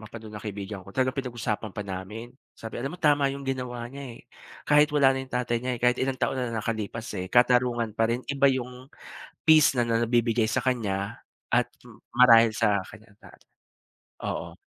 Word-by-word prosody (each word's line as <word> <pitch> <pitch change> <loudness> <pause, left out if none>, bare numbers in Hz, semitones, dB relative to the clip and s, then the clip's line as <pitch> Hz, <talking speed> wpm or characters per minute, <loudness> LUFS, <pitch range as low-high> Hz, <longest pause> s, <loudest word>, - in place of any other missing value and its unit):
mapanuod 110 0 -10
ng - - -14
kaibigan 100 -1 -6
ko, 100 - -13
talagang 130 0 0
pinag-usapan 115 -5 -3
pa 105 - -4
namin, 100 +5 -7 0.2
sabi, 115 +1 -8
"Alam 135 +6 -4
mo 180 - -12
tama 145 -2 +4
yung 140 - -8
ginawa 125 -3 -4
niya, 135 -3 -8
eh, - - -15 0.4
kahit 150 0 +5
wala 140 -2 +5
na 130 - -3
yung 130 - -10
tatay 120 -1 0
niya, 125 +2 -3
eh, - - -13
kahit 125 0 +3
ilang 135 0 0
taon 130 - -1
na 125 - -1
ang - - -1
nakalipas, 115 +1 -4
eh, 90 - -3
katarungan 120 +1 +3
pa 115 - +4
rin, 120 +2 -2
iba 140 0 +3
yung 125 -1 -2 0.6
peace 155 -3 +6
na 120 - +2
na 115 0 0
nabibigay 115 -1 +2
sa 110 - -1
kaniya, 105 -6 -2 0.3
at - - +3 0.5
marahil 115 -3 +7
sa 105 -3 +2
kaniyang 110 -2 -16
tatay." - - -18 0.8
Oo. 85 0 -4
120 Hz, 190 wpm, -26 LUFS, 110-130 Hz, 0.8 s, marahil